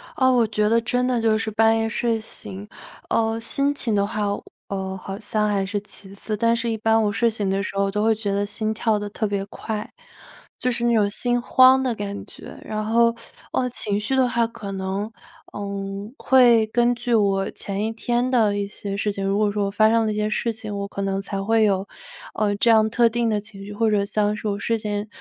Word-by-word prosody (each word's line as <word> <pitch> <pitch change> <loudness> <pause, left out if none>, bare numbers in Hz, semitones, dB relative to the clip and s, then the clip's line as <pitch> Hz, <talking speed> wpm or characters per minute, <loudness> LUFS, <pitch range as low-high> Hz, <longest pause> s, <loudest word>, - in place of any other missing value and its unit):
呃， 260 -1 +4
我 240 -2 +4
觉 210 -1 +1
得 230 +1 +4
真 245 +2 0
的 250 -2 +1
就 220 -1 +3
是 220 0 -3
半 225 +1 +4
夜 225 0 0
睡 230 0 0
醒， 210 -2 -9 0.4
呃， 225 0 +1
心 275 +5 +1
情 230 -6 -1
的 200 -1 +2
话， 215 -2 -2 0.4
呃， 190 -1 -3
好 195 +1 -6
像 215 -1 -1
还 195 -2 0
是 205 +1 -2
其 195 -1 -10
次， 215 +1 -3
但 230 +2 +3
是 235 0 -2
一 225 - -1
般 225 +1 +3
我 205 - +1
睡 235 +3 +2
醒 210 -3 -2
的 195 +1 0
时 200 - -5
候， 195 0 +1
都 210 +1 0
会 220 0 +3
觉 205 -2 -3
得 200 +1 0
心 215 +1 -2
跳 220 0 +1
得 205 0 -4
特 215 +1 -2
别 200 -1 -2
快。 210 +1 -6 0.7
就 250 - 0
是 235 0 -1
那 235 -1 +3
种 210 -2 +3
心 245 +4 0
慌 260 +2 +5
的 250 -2 0
感 205 -1 -5
觉， - - -12
然 215 0 -3
后， 230 +1 +3 0.4
呃， 250 -1 +1
情 205 -4 -2
绪 265 +6 -1
的 260 -1 +4
话 235 -1 +1
可 205 -3 -8
能， 190 +1 -3 0.5
嗯， 200 +1 -5
会 240 -4 +5
根 240 0 +3
据 240 0 -2
我 195 -3 +2
前 200 +1 -4
一 220 - -1
天 240 +3 -1
的 215 -5 +3
一 200 - -1
些 200 0 -6
事 205 0 0
情， 195 0 -4
如 195 +1 +1
果 210 -1 +2
说 205 -1 -1
我 - - -3
发 215 +1 +4
生 230 0 +3
了 215 - 0
一 - - -3
些 210 0 0
事 230 +2 0
情， 215 -2 -7
我 200 0 -3
可 200 - -5
能 195 0 -1
才 195 0 -4
会 225 +1 +3
有， 195 -2 +1 0.5
呃， 205 -1 0
这 230 +3 +3
样 220 -1 +5
特 235 +1 +4
定 235 0 0
的 210 -1 +1
情 200 -1 -10
绪， 205 - -8
或 220 +2 0
者 205 -1 +2
像 210 +1 0
是 215 - -5
我 200 -1 -1
事 230 +2 -1
先 210 0 -3
215 Hz, 255 characters per minute, -23 LUFS, 200-230 Hz, 0.7 s, 慌